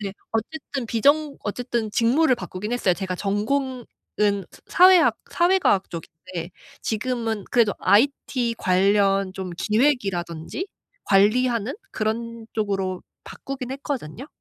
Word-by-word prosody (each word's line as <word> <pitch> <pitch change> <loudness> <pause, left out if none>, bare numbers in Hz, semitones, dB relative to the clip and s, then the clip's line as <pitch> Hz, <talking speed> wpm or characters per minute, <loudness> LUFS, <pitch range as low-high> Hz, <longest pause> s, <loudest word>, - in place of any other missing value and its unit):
네. 200 -2 -4 0.2
어쨌든 255 +2 -3
비정 285 +6 +2
어쨌든 235 0 -2
직무를 255 +6 +3
바꾸긴 210 -1 -6
했어요. 200 -7 +2
제가 185 -1 -4
전공은 240 +6 -1 0.7
스 - - -17
사회학 365 -1 +6
사회 360 +2 +3
과학 195 - +2
쪽인데 170 +1 -7 0.3
지금은 225 -2 -2
그래도 230 -4 +3
IT 245 +1 +2
관련 195 +1 +2
좀 190 -1 -6
기획이라든지, 205 - 0 0.4
관리하는 230 +5 +3 0.2
그런 230 +1 -3
쪽으로 195 -4 -2 0.2
바꾸긴 265 -2 -7
했거든요. 270 - -5
225 Hz, 280 characters per minute, -23 LUFS, 195-255 Hz, 0.7 s, 사회학